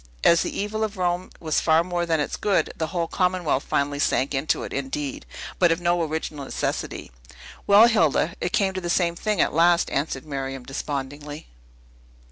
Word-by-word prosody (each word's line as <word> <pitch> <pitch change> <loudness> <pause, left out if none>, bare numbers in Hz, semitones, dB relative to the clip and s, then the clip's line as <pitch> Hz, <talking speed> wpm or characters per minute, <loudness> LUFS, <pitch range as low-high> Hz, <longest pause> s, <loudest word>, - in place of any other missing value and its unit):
As 170 0 +5
the - - -3
evil 215 +2 -2
of 215 -2 -3
Rome 180 0 -1
was 155 -2 0
far 160 0 +3
more 175 -1 -2
than 160 -2 +1
its 150 - -2
good, 200 -2 0
the 160 - -2
whole 170 -1 -2
commonwealth 180 -7 0
finally 145 0 -1
sank 140 -1 +1
into 135 +3 0
it, - - -6
indeed, 140 +1 -4 0.3
but 175 -2 +5
of 165 - +1
no 175 0 +1
original 155 -2 -3
necessity." 135 - -4 0.6
"Well, 205 +3 +8
Hilda, 170 - +2
it 175 - -1
came 200 -2 +1
to 185 - -4
the 175 - -4
same 170 -1 +1
thing 210 +2 -1
at - - +2
last," 170 +2 +3
answered 140 -1 -2
Miriam 135 -3 -5
despondingly. 145 +2 -6
165 Hz, 180 wpm, -24 LUFS, 145-180 Hz, 0.6 s, Well